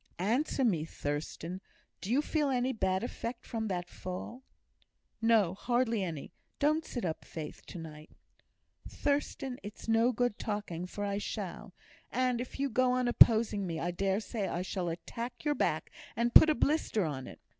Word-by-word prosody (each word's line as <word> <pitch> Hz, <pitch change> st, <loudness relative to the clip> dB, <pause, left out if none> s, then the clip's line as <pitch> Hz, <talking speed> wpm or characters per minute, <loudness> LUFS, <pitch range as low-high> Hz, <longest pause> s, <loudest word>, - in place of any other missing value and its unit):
"Answer 245 Hz, -, +1 dB
me, 175 Hz, -9 st, +2 dB
Thurstan. 160 Hz, +4 st, -4 dB, 0.4 s
Do 200 Hz, -, -4 dB
you 280 Hz, +4 st, +3 dB
feel 300 Hz, -3 st, +1 dB
any 255 Hz, 0 st, +1 dB
bad 190 Hz, -3 st, 0 dB
effect 240 Hz, 0 st, -5 dB
from 220 Hz, -1 st, -3 dB
that 180 Hz, -3 st, -2 dB
fall?" 185 Hz, +8 st, -6 dB, 0.8 s
"No, 225 Hz, -6 st, +4 dB
hardly 235 Hz, 0 st, +1 dB
any. 160 Hz, -6 st, -5 dB, 0.2 s
Don't 305 Hz, +2 st, +2 dB
sit 245 Hz, -9 st, -4 dB
up, 160 Hz, -2 st, -3 dB
Faith, 155 Hz, -2 st, -7 dB
to -, -, -8 dB
night!" 155 Hz, -2 st, -9 dB, 0.8 s
"Thurstan, 280 Hz, -3 st, -1 dB
it's 205 Hz, +3 st, -9 dB
no 225 Hz, +2 st, +4 dB
use 245 Hz, 0 st, +3 dB
talking, 205 Hz, -5 st, -3 dB
for 205 Hz, +2 st, -4 dB
I 200 Hz, 0 st, -1 dB
shall; -, -, -5 dB, 0.4 s
and, 250 Hz, -2 st, +1 dB
if 250 Hz, -, -7 dB
you 280 Hz, -, +2 dB
go 255 Hz, 0 st, +2 dB
on 250 Hz, -1 st, +1 dB
opposing 220 Hz, -4 st, +5 dB
me, 165 Hz, -2 st, -3 dB
I 175 Hz, +2 st, -1 dB
dare 195 Hz, +2 st, +1 dB
say 215 Hz, -3 st, -3 dB
I 175 Hz, 0 st, -2 dB
shall 185 Hz, -2 st, -2 dB
attack 235 Hz, -, -6 dB
your 295 Hz, -, +3 dB
back, -, -, 0 dB, 0.2 s
and 235 Hz, +1 st, +1 dB
put 315 Hz, -, +10 dB
a 305 Hz, -, +4 dB
blister 285 Hz, -, +1 dB
on 135 Hz, -4 st, -4 dB
it. -, -, -11 dB
220 Hz, 170 wpm, -32 LUFS, 180-250 Hz, 0.8 s, put